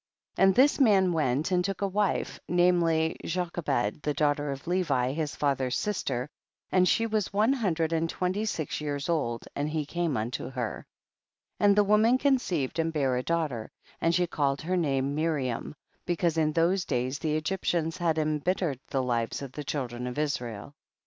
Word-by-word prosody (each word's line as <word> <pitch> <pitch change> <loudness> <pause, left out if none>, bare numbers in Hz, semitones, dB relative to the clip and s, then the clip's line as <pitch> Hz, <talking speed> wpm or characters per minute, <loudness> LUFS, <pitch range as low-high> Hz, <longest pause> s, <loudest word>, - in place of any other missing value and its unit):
2. - - -2
And 190 -1 +6
this 280 +4 +5
man 195 -8 +4
went 150 +1 0
and 180 -1 +2
took 195 +1 -3
a - - +2
wife, 200 +1 -1
namely 170 -2 +2
Jochebed 170 - -1
the 150 -1 -1
daughter 145 0 +1
of 140 0 -5
Levi 150 -9 +1
his 150 -1 -3
father's 135 -3 0
sister, 135 -11 -2 0.4
and 185 -1 +4
she 230 - +2
was 215 -3 -1
one 215 +6 +3
hundred 170 -10 0
and 165 0 0
twenty 185 +5 -1
six 155 -8 -3
years 145 +1 -3
old, 140 -9 -1
and 145 +1 -1
he 155 -1 -2
came 170 -2 -1
unto 115 +3 -3
her. 125 -4 -4 0.7
3. - - +2
And 200 - +5
the 210 - +5
woman 215 +4 +4
conceived 185 - 0
and 165 0 +1
bare 135 -5 +1
a 125 - 0
daughter, 150 -8 -2 0.3
and 165 0 +2
she 180 0 +3
called 140 -4 -1
her 180 +3 0
name 140 -5 0
Miriam, 150 -4 -2 0.3
because 175 -2 +1
in 155 -1 +1
those 175 +3 +2
days 130 +1 -2
the 155 0 -1
Egyptians 165 0 -1
had 165 -3 0
embittered 155 -1 0
the 135 -1 -1
lives 120 +1 -1
of 135 - -7
the 150 - -6
children 125 -4 -3
of 125 - -5
Israel. 125 -5 -3
160 Hz, 180 wpm, -28 LUFS, 140-180 Hz, 0.7 s, And